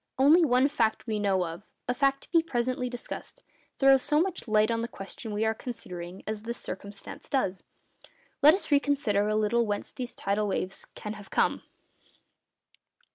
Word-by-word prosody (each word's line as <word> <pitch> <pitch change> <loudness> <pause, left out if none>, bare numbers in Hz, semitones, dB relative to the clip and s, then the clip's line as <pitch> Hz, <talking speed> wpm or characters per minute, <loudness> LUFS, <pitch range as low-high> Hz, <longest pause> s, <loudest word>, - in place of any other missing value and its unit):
Only 300 +6 +6
one 255 -2 +4
fact 225 -6 0
we 215 -3 -1
know 195 -3 +2
of—a 175 +8 -6
fact 275 +1 +1
to - - -18
be 335 -1 +5
presently 250 -4 -1
discussed—throws 270 +2 -1
so 300 +2 +2
much 360 -5 -1
light 215 +1 +3
on 230 - 0
the 230 - -2
question 205 +1 -8
we 210 +1 0
are 220 - +2
considering 180 -7 -7
as 215 -1 -4
this 235 +2 -5
circumstance 200 +2 -8
does. 195 -9 0 0.8
Let 300 +4 +8
us 395 - -3 0.2
consider 245 -9 +1
a 215 - +1
little 215 +2 +2
whence 205 -1 -2
these 250 -1 -6
tidal 205 +1 0
waves 190 -1 -3
can 210 - -5
have 205 -2 -11
come. - - +1
225 Hz, 165 wpm, -28 LUFS, 205-265 Hz, 0.8 s, Let